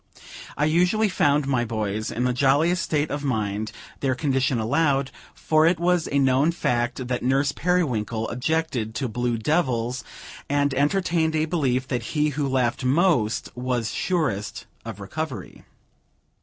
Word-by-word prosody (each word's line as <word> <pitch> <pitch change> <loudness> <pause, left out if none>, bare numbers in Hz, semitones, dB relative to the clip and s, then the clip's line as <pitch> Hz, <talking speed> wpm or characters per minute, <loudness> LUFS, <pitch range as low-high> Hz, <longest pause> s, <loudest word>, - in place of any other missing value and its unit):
I 150 - +2
usually 180 +7 +2
found 145 -5 +2
my 130 -3 +1
boys 110 -2 -2
in 120 - -2
the 125 0 +1
jolliest 145 +7 +3
state 150 -1 -1
of 145 0 -3
mind 110 -5 -1 0.3
their 130 -2 0
condition 135 -2 +1
allowed; 135 +4 +1 0.2
for 155 0 +3
it 170 -1 +2
was 175 -1 +2
a 140 - 0
known 135 +3 +3
fact 120 -5 -1
that 125 -1 -2
Nurse 135 +2 +2
Periwinkle 125 -11 0
objected 125 -4 -1
to 135 - -1
blue 120 0 -1
devils, 125 -2 0 0.5
and 145 0 +1
entertained 160 +2 +1
a 155 0 +2
belief 135 -6 0
that 125 -2 -1 0.2
he 150 0 +3
who 145 0 -2
laughed 130 -1 0
most 130 - +1
was 125 -2 -2
surest 125 - -2 0.2
of 115 -3 -7
recovery. 140 +7 -6
135 Hz, 145 wpm, -24 LUFS, 120-155 Hz, 0.5 s, jolliest